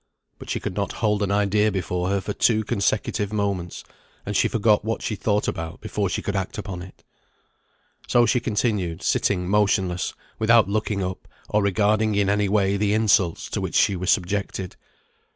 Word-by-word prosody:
But - - -10
she - - -1
could - - -4
not - - -2
hold 105 -2 0
an 100 - 0
idea 105 +1 +2
before 90 -1 -2
her 100 0 +1
for 105 - -4
two 110 0 +2
consecutive 100 0 -1
moments; 100 -5 -2 0.4
and - - -4
she - - +3
forgot 105 -2 +2
what 115 +1 -3
she - - -2
thought 105 +1 0
about 80 +1 -4
before 100 -3 -2
she - - -3
could 100 - -2
act 95 -2 -3
upon 100 -4 -5
it. 95 +2 -13 1.0
So 120 -1 +4
she 125 - +2
continued 105 -7 -1
sitting 90 -3 +1
motionless, 95 -3 +1 0.2
without 115 -1 +5
looking 105 -1 -1
up, 95 0 -5 0.2
or 105 - +2
regarding 105 +2 +2
in 100 -1 +2
any 105 -1 +1
way 100 -1 +2
the 105 +1 +1
insults 105 -5 +2
to - - -2
which - - -4
she 100 - +4
was 90 +1 -3
subjected. 95 -1 -1
100 Hz, 180 wpm, -23 LUFS, 95-105 Hz, 1.0 s, without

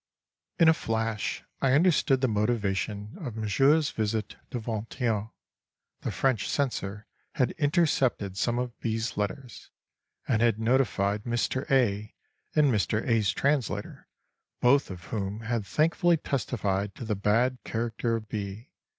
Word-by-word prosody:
In 165 - +5
a 160 - +8
flash 115 -6 -2 0.2
I 130 -1 +3
understood 145 -4 +4
the 130 - +3
motivation 105 -2 -1
of 130 - -5
Monsieur's 135 +8 +3
visit 110 -1 -2
to 125 - -3
Vingt 110 +2 -5
et 125 - +1
Un: 110 -1 0 0.7
the - - -2
French 130 -4 0
censor 105 -7 -2 0.3
had 130 - +2
intercepted 145 - +1
some 120 +4 0
of 125 -1 -3
B.'s 115 +1 -2
letters, 115 +5 -4 0.6
and 110 - +2
had 115 -2 +3
notified 110 -4 +1
Mr. 120 +3 -1
A. 110 -5 +1 0.4
and 150 -3 +5
Mr. 110 +2 0
A.'s 115 -4 +3
translator, 140 0 -1 0.5
both 135 +3 +4
of 90 -2 -8
whom 100 +4 -4
had 115 -2 -2
thankfully 165 - +3
testified 105 -9 -2
to 120 - -7
the 110 - 0
bad 115 +6 +1
character 115 0 -1
of 110 -1 -5
B. 105 +3 -6
115 Hz, 140 wpm, -28 LUFS, 105-130 Hz, 0.7 s, a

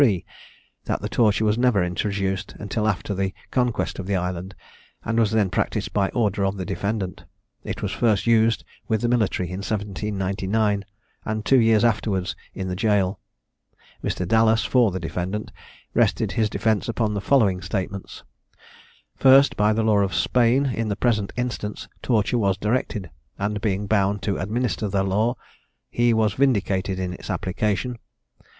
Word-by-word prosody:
That - - -2
the - - -2
torture 110 -2 +2
was 105 +2 +2
never 120 -7 +3
introduced 95 +2 -2
until 105 +1 -2
after 100 0 -1
the 95 0 -2 0.2
conquest 125 -5 0
of 95 - -5
the 100 - 0
island, 90 +1 -3 0.5
and 115 +1 +1
was 110 -3 +3
then 105 -4 +1
practised - - -1
by 100 -2 +2
order 105 -4 0
of 95 +1 0
the 95 - -4
defendant. 100 -3 -3 0.4
It - - -5
was - - -1
first 110 -5 +1
used 115 -1 +3 0.2
with 110 -2 0
the 120 - +1
military 110 -7 +1
in 90 +1 -5
1799, 100 0 -1 0.4
and 110 0 -3
two 135 - +5
years 115 -1 +4
afterwards 105 -5 0 0.2
in 95 - -4
the 90 - -2
gaol. 100 -2 +1 0.8
Mr. 90 - -2
Dallas, 110 -1 +3
for 120 +2 +4
the 95 0 -4
defendant, 90 +5 -4 0.4
rested - - +2
his 110 -2 +1
defence 105 +2 0
upon 110 -2 0
the 100 - -2
following 100 -8 +3
statements: 95 0 -5 0.9
First, 135 +1 +6
By 105 +1 +3
the 110 +1 +1
law 110 -2 +3
of 100 -1 0
Spain, 125 +3 +3
in 115 -4 -1
the 100 - -1
present 105 -2 0
instance, 120 -4 -3
torture 115 0 +1
was 100 -3 +1
directed; 105 -3 -2 0.3
and, 105 +1 -2
being 100 -1 -1
bound 100 -1 +1
to 100 -4 0
administer 110 +3 -1
that 95 -1 0
law, 110 +6 +1 0.6
he 120 0 +3
was 110 -2 +2
vindicated 100 -7 +1
in 90 -1 -3
its - - -10
application. 105 +5 -1
105 Hz, 160 wpm, -23 LUFS, 95-115 Hz, 0.9 s, First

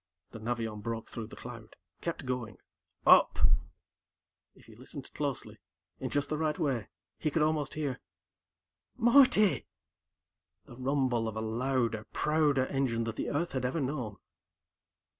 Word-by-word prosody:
The 115 - -8
Navion 110 -2 -3
broke 115 0 -4
through 115 -2 -5
the - - -10
cloud, 115 -3 -10 0.3
kept 170 -4 -3
going. 125 -3 -3 0.5
"Up." - - +7 1.2
If - - -19
he - - -15
listened - - -9
closely, - - -3 0.4
in - - -3
just 145 0 0
the 155 - -2
right 155 -2 0
way, 130 -7 0 0.3
he 155 - +1
could 150 +1 +2
almost 155 -2 0
hear... 145 -5 -2 1.0
"Marty!"... 240 -4 +5 1.0
the 120 - -12
rumble 130 -3 +1
of 110 - -4
a 110 - -2
louder, 115 -1 0
prouder 150 -4 +2
engine 130 -4 0
than 115 0 -3
the - - -3
Earth 170 +4 -1
had 130 -2 -2
ever 130 +6 0
known. 130 -7 -3
130 Hz, 140 wpm, -31 LUFS, 115-150 Hz, 1.2 s, Up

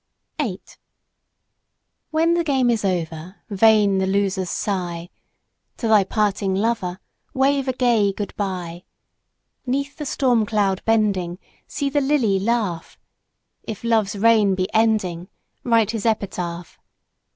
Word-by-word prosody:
8 205 -10 -5 1.3
When 325 +2 +2
the 340 0 +1
game 265 -5 +2
is 225 -3 -1
over, 170 -1 -3 0.2
vain 205 -1 +4
the 190 - 0
loser's 190 -1 0
sigh. 180 -4 -3 0.7
To 230 - -2
thy 215 -2 +5
parting 200 -1 0
lover, 195 -4 -1 0.4
wave 275 0 +2
a 260 - 0
gay 235 -5 +2
good 200 +1 -6
by! 180 -3 -4 0.8
'Neath 280 +3 -2
the 300 - -5
storm 245 -4 +2
cloud 200 -3 0
bending, 200 -6 +1 0.3
see 285 - -3
the 285 +1 +1
lily 265 -9 +2
laugh. 205 -6 -2 0.6
If 215 -1 -7
Love's 220 -3 +1
reign 210 -2 +4
be 185 0 -1
ending 210 -6 +1 0.4
write 230 -3 +2
his 225 -1 -2
epitaph! 180 -5 -3
210 Hz, 125 wpm, -22 LUFS, 190-235 Hz, 1.3 s, thy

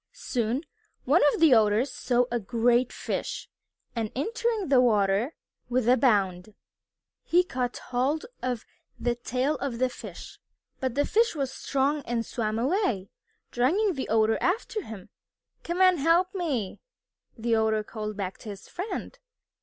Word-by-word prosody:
Soon 250 - -2 0.4
one 295 +7 +4
of - - -3
the 320 -5 +6
Otters 220 +3 +3
saw 245 -1 +1
a 240 - +1
great 240 +3 +2
fish, - - -4 0.5
and 225 -2 -2
entering 445 - -1
the 265 -3 +6
water 210 +2 +2 0.3
with 245 -1 +1
a 250 - +7
bound, 200 -6 +1 0.7
he 355 +1 +3
caught 250 -7 -3
hold 265 +5 -1 0.2
of 250 -2 -2 0.3
the 240 - +1
tail 255 +4 -1
of 270 -4 -3
the 255 +1 +2
fish. - - -10 0.4
But 260 -2 -2
the 285 - +2
fish 455 -3 +2
was 270 -3 -2
strong 280 +2 0
and 230 -1 -1
swam 220 -2 -2
away, 245 - 0 0.4
dragging 360 - +2
the 270 -4 -4
Otter 220 0 +3
after 430 +3 0
him. 215 - -10 0.5
"Come 345 +2 -2
and 370 -3 +5
help 335 +5 +3
me," 285 - -2 0.6
the 230 +1 0
Otter 220 -1 +2
called 215 -1 -6
back 195 -2 -4
to 220 - -9
his 200 -1 -9
friend. 425 +6 -5
250 Hz, 150 wpm, -27 LUFS, 225-305 Hz, 0.7 s, a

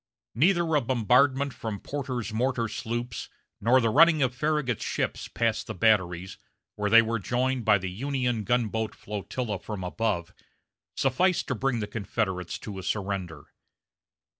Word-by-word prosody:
Neither 170 +4 +2
a 150 - +4
bombardment 130 +3 +2
from 110 -3 -5
Porter's 125 -6 -4
mortar 120 0 0
sloops, 120 +1 -4 0.3
nor 120 +5 +4
the 115 -3 +1
running 155 +2 +6
of 130 -1 +1
Farragut's 150 -3 -1
ships - - -2
past - - -1
the - - -5
batteries, 95 -3 +1 0.4
where 105 0 -1
they 115 +2 +8
were 115 0 -1
joined 125 +3 -1
by 105 -2 +6
the 95 -1 -5
Union 125 0 -1
gunboat 110 -1 0
flotilla 105 +1 -4
from 105 -4 -6
above, 90 -2 -2 0.6
sufficed 170 +8 +2
to - - +1
bring 125 -1 -1
the - - -1
Confederates 100 -4 -3
to 100 -3 -7
a - - -5
surrender. 95 -5 -4
115 Hz, 145 wpm, -27 LUFS, 100-130 Hz, 0.6 s, they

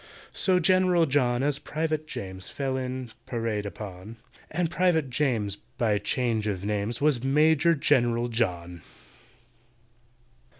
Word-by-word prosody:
So 185 -2 +2
GENERAL 180 -1 +4
JOHN 130 -3 +1
as 145 0 0
PRIVATE 155 0 -2
JAMES 95 -7 -6
Fell 135 -2 -2
in, 130 -2 -4 0.2
parade 115 -4 -2
upon; 100 +2 -8 0.3
And 170 +1 -1
PRIVATE 170 -7 +1
JAMES, 115 -8 0 0.2
by 105 -3 +2
change 110 0 -1
of 100 -2 -3
names, 105 +3 -2
Was 145 -5 +2
MAJOR 155 +4 +4
GENERAL 120 -5 +2
JOHN. 90 -7 -2
125 Hz, 120 wpm, -27 LUFS, 105-150 Hz, 0.3 s, GENERAL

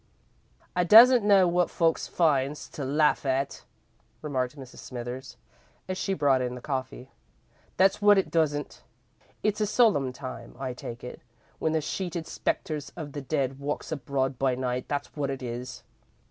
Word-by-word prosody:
"I 180 - +3
doesn't 235 +6 +8
know 200 -3 +5
wot 175 +1 +2
folks 165 -1 +1
finds 145 -3 +1
to 145 - -6
laugh 150 +3 +2
at," 135 0 -2 0.6
remarked 130 -2 -2
Mrs. 130 -2 -11
Smithers, 125 0 -7 0.5
as 185 - -2
she 195 +1 -1
brought 140 -4 +3
in 125 0 -2
the - - -7
coffee; 130 -1 -5 0.7
"that's 190 +2 +3
wot 205 0 +6
I - - +6
doesn't. 150 -5 -1 0.6
It's 210 0 0
a 210 - +2
solemn 200 - +3
time, 130 +1 -8
I 130 -2 -4
take 120 -1 -8
it, 125 - -8 0.4
when 160 - 0
the 160 - +1
sheeted 175 +1 -4
spectres 150 -2 -3
of 155 -4 -7
the 145 - -5
dead 135 -1 -2
walks 145 +3 -4
abroad 135 -2 -2
by 130 -2 +2
night, 125 0 -3
that's 145 -1 -4
wot 145 -2 -2
it 135 -1 -4
is. 125 +1 -6
145 Hz, 160 wpm, -27 LUFS, 130-170 Hz, 0.7 s, doesn't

